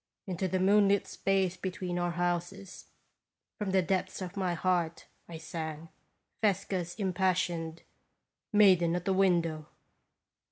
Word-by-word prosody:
Into 190 -1 -2
the 185 +1 -1
moon 200 +2 +5
lit 200 0 +2
space 190 -2 0
between 185 -2 -3
our 175 0 0
houses, 175 +2 -3 0.7
from 210 -2 -2
the 190 -1 +3
depths 185 +2 -1
of 185 0 -6
my 185 -3 -1
heart, 170 -2 0 0.2
I 165 - -7
sang 160 0 -6 0.5
Fesca's 185 -4 0
impassioned 180 -4 -1 0.4
" - - -58
Maiden 175 -4 +5
at 180 - -3
the 195 - +2
Window." 170 -5 +1
180 Hz, 130 wpm, -30 LUFS, 170-190 Hz, 0.7 s, moon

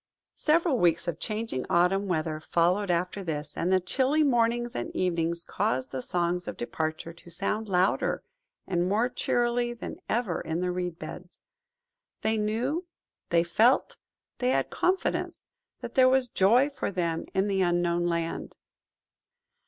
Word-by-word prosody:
Several 315 -4 +2
weeks 170 0 +2
of 170 -1 -2
changing 215 - -3
autumn 185 +3 +3
weather 155 -3 -1
followed 175 +5 +1
after 180 +3 -1
this, 150 -3 -4
and 180 - 0
the 190 - +5
chilly 265 - +2
mornings 240 -3 +2
and 120 - -3
evenings 170 -1 0
caused 130 -4 -1
the 130 - -3
songs 175 +3 -1
of - - -5
departure 160 +6 -3
to 170 +1 -15
sound 200 +5 -2
louder 185 +1 +1 0.4
and 180 -1 0
more 220 +5 +2
cheerily 240 0 0
than 235 - -7
ever 220 -7 0
in 160 +1 -3
the 180 0 0
reed 180 -2 -3
beds. 170 +3 -9 0.8
They 220 +1 +2
knew, 240 +11 -1 0.5
they 170 -1 +4
felt, 220 +10 +3 0.4
they 250 - +1
had - - +1
confidence, 375 +2 -1 0.3
that - - -6
there 260 -2 +6
was 260 -1 +2
joy 240 +10 +4
for 275 - -3
them 170 -4 -1
in 190 +2 +2
the 195 -1 +1
Unknown 175 -1 +1
Land. 170 -1 -3
185 Hz, 150 wpm, -28 LUFS, 170-235 Hz, 0.8 s, there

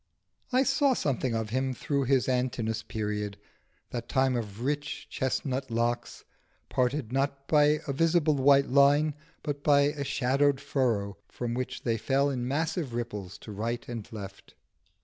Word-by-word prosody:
I 255 +1 +4
saw 275 0 +3
something 130 - 0
of 110 -1 -2
him 130 +1 0
through 140 -1 -1
his 130 -3 +3
Antinoüs 125 -3 -1
period, 105 -2 -3 0.5
the 120 - -2
time 130 +2 +1
of 110 -2 -4
rich 145 +2 -2
chesnut 130 0 -2
locks, 120 +1 -2 0.4
parted 125 -1 0
not 140 0 -1
by 150 0 +4
a 140 - -1
visible 165 +1 +3
white 140 -1 +4
line, 145 +2 +5 0.3
but 145 -1 -3
by 145 -1 +5
a 145 0 0
shadowed 140 +1 +2
furrow 115 - 0
from 120 -1 -4
which 125 +1 -4
they 115 -2 +1
fell 135 +5 +1
in 125 -2 -2
massive 155 -1 -1
ripples 105 -5 -5
to 110 - -9
right 115 +4 -3
and 115 -4 -6
left. 100 -3 -9
130 Hz, 150 wpm, -29 LUFS, 115-145 Hz, 0.5 s, line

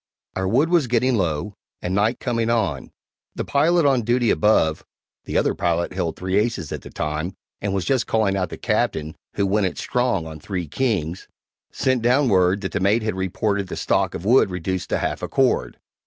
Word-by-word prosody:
Our 95 0 -1
wood 135 +11 +2
was 170 -6 +3
getting 125 +2 +2
low, 90 0 -1 0.3
and 90 - -3
night 105 +5 +1
coming 115 -2 -1
on. 100 - -1 0.4
The - - -3
pilot 160 +3 +3
on 135 -3 +3
duty 120 +1 +2
above 95 -7 +2 0.4
(the - - -1
other - - +2
pilot 85 +1 -1
held 90 -3 -2
three 95 +1 -1
aces 105 -8 -2
at - - -4
the - - -11
time, 75 +4 -3 0.3
and 100 - -1
was 95 -3 -1
just 125 +3 +1
calling 110 -3 +1
out 90 -3 -1
the - - -7
Captain, 80 0 -1 0.2
who 100 - +1
"went 100 0 +2
it - - -6
strong" 125 -9 0
on 80 -1 -8
three 90 +1 -4
kings) 90 - -2 0.4
sent 130 -2 0
down 125 +3 +3
word 95 0 +3
that 95 - -3
the 95 - -1
mate 105 +4 +2
had 110 - -1
reported 100 +2 -1
the - - -5
stock - - 0
of 85 - -6
wood 120 -1 +5
reduced 90 0 -3
to - - +1
half - - -2
a - - -3
cord. 60 - +1
100 Hz, 200 wpm, -22 LUFS, 90-120 Hz, 0.4 s, wood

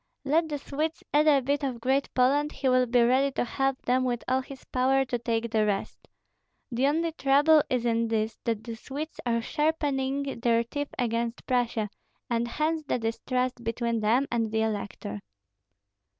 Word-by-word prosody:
Let 315 +3 +2
the 295 - -2
Swedes 305 +3 -3
add 300 +1 +4
a 280 -3 +5
bit 285 +3 0
of 255 -4 -2
Great 265 +3 0
Poland, 285 +4 +3
he 270 - -2
will 255 -1 +4
be 240 0 +4
ready 260 +3 +3
to - - 0
help 270 +2 -1
them 255 +1 +2
with 245 -2 -1
all 260 +1 +2
his 265 0 -11
power 265 +1 +2
to 245 -2 -2
take 230 -1 -1
the 220 -1 +2
rest. 205 -2 -2 0.6
The 250 +3 +2
only 325 +3 +1
trouble 295 +1 +4
is 250 -2 0
in 230 0 +1
this, 220 0 -1
that 225 -2 -1
the 230 -1 -6
Swedes 285 +7 -7
are 230 -1 +1
sharpening 280 -3 -1
their 235 0 +2
teeth 290 +4 -4
against 235 -1 -2
Prussia, 240 -4 0 0.4
and 235 0 +1
hence 310 +6 -1
the - - +1
distrust 250 +2 -2
between 230 0 -1
them 230 +6 +2
and 230 -2 0
the 220 0 +1
elector." 200 - -4
255 Hz, 180 wpm, -27 LUFS, 230-280 Hz, 0.6 s, a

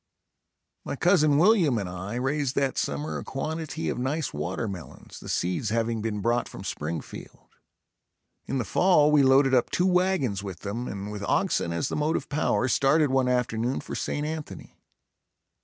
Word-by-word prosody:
My - - -4
cousin 155 -3 +4
William 175 - +4
and 100 -3 -2
I 95 +5 -6
raised 130 +2 -1
that 135 -2 +1
summer 150 +1 -2
a - - -7
quantity 160 +3 -4
of - - -2
nice 145 +5 -2
watermelons, 90 +4 -5
the - - -10
seeds 90 +5 -1
having 115 0 0
been 105 -2 -3
brought 120 +3 0
from - - -9
Springfield. 80 +1 -6 1.0
In 135 - -1
the 120 - -1
fall 150 - +4
we 150 -1 +5
loaded 135 0 +5
up 125 - +3
two 180 - +1
wagons 180 - +1
with 95 -4 -7
them 115 +5 -4
and 100 +1 -5
with 105 -1 -6
oxen 85 - +1
as 85 -1 -1
the - - -3
motive 150 +2 -1
power 145 -3 +1
started 140 +3 +3
one 130 -1 +2
afternoon 125 0 0
for - - -8
St. 145 - -2
Anthony. 155 0 -7
130 Hz, 165 wpm, -26 LUFS, 105-150 Hz, 1.0 s, we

